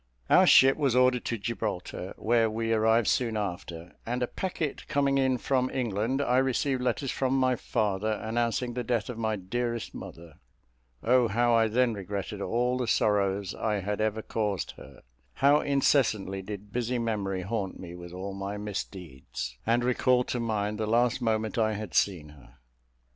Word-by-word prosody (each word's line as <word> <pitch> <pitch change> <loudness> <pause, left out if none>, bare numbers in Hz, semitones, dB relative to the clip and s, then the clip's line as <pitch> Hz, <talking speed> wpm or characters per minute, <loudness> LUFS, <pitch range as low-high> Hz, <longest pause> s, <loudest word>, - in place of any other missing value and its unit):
Our - - +7
ship 135 +1 +7
was 140 -5 +1
ordered 125 -1 +3
to 115 - -1
Gibraltar, 95 -4 -4
where 115 0 +2
we 115 +1 -1
arrived 110 0 +3
soon 115 -3 +1
after; 90 -4 -5
and 125 +2 -2
a - - 0
packet 170 -3 -4
coming 140 -1 +2
in 130 -1 +2
from 130 +1 0
England, 120 +2 -1
I 125 -1 +3
received 130 0 0
letters 130 +1 -1
from 130 0 0
my 130 -1 +3
father, 105 -1 -1
announcing 115 +2 -1
the 125 0 -3
death 115 -1 -1
of 115 - -8
my 110 -1 0
dearest 115 +4 -3
mother. 80 -2 -10 0.6
O 125 0 +4
how 120 +3 +2
I 115 -1 +4
then 120 +2 +2
regretted 100 0 -5
all 125 +4 0
the 125 - -1
sorrows 100 -2 +1
I 110 -1 -1
had 105 +2 -2
ever 110 0 -1
caused 105 -4 -2
her; - - -14 0.3
how 140 +2 +5
incessantly 125 -9 +1
did 100 +1 -8
busy 125 0 -1
memory 100 -5 -2
haunt 100 -1 -3
me 85 -2 -8
with 85 0 -9
all 95 +2 -6
my 100 +1 -4
misdeeds, 80 -11 -6
and 120 +1 +3
recall 125 0 +3
to 125 - -3
mind 105 -2 -1
the 110 - -1
last 120 +2 +2
moment 110 -1 0
I 110 -1 +2
had 105 -3 -6
seen 85 -7 +1
her! 70 -4 -17
110 Hz, 170 wpm, -28 LUFS, 100-125 Hz, 0.6 s, Our